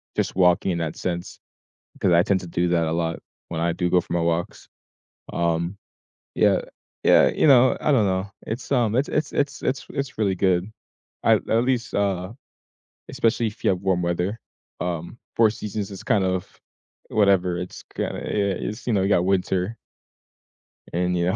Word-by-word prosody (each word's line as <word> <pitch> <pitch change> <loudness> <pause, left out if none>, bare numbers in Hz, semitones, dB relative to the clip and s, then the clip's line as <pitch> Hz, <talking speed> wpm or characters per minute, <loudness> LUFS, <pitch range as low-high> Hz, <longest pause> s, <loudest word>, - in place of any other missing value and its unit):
just - - -1
walking 90 0 +3
in 85 - -1
that 80 -2 -3
sense 85 -1 -4 0.6
'cause 90 - +2
I 85 +1 +5
tend 95 -2 +1
to 90 - -8
do 85 +1 0
that 85 -2 +2
a - - -1
lot 85 0 -1 0.3
when 80 -1 -3
I 85 0 +2
do 90 0 -1
go 90 0 +4
for 85 - -7
my 85 - +1
walks. 85 +1 -2 0.7
Um, 85 +3 0 0.6
yeah, - - +3 0.4
yeah, - - +6
you - - +2
know, 130 -3 +6
I 150 - +2
don't 115 -7 +4
know 95 +1 -1 0.2
It's 115 +4 -5
um 120 -4 +2
it's 135 +3 +1
it's 155 - -1
it's 145 0 -1
it's 135 +1 -1
it's 140 -4 -4
really 100 -3 +1
good. 95 +2 +1 0.5
I - - +5
at 115 +2 +1
least, 125 -2 -1
uh, 95 -1 0 0.8
especially 115 0 +1
if 105 - -12
you - - +4
have 90 -1 0
warm 95 -2 +1
weather, 90 +5 -1 0.4
um, 85 +5 -4 0.2
four 115 -2 +5
seasons 105 -1 -5
is 95 - -8
kind 105 -5 +2
of 95 -1 -3 0.5
whatever, 95 -4 +2
it's 90 0 -7
kinda, - - -3
yeah 100 -2 0
it's, 110 +3 -7
you 120 - +1
know, 95 - +2
you 95 - +1
got 90 -3 +3
winter. 95 +2 0 1.2
And, 90 +1 0
you 85 0 +1
know, 95 - +1
95 Hz, 185 wpm, -24 LUFS, 90-110 Hz, 1.2 s, yeah